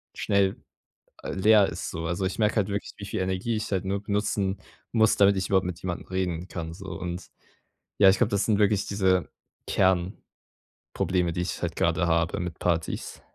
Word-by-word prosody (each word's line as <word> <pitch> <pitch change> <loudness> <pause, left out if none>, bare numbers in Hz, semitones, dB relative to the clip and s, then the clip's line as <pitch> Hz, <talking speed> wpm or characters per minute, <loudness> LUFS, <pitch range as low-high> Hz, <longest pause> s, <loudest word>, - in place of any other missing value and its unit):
schnell, 100 -1 +1 0.7
äh, - - -5
leer 105 +1 +5
ist - - -5
so. 80 0 -4
Also, 85 +3 -1
ich 95 - -3
merke 105 0 +2
halt 105 -1 +1
wirklich, 100 +1 -4
wie 100 - -7
viel 100 - -3
Energie 95 +5 -1
ich 105 - -4
halt 95 -2 -1
nur 100 +1 -1
benutzen 100 -1 -1 0.3
muss, 110 -2 +4
damit 100 -1 +5
ich 95 - -1
überhaupt 95 -2 +3
mit 90 -2 -5
jemandem 90 -1 -4
reden 90 -2 -2
kann 80 -2 -5
so. 95 +2 -10
Und, 90 0 -5 0.7
ja, 95 - +8
ich 95 - +4
glaube, - - +1
das 100 0 +1
sind 105 -2 +2
wirklich 105 -1 +3
diese 95 -3 +1 0.4
Kernprobleme, 95 -1 0 0.9
die 90 - -1
ich 90 - -4
halt 85 -1 -2
grade 85 +1 +1
habe 85 0 +1
mit 90 -2 -5
Partys. 85 -2 -2
95 Hz, 190 wpm, -26 LUFS, 90-100 Hz, 0.9 s, ja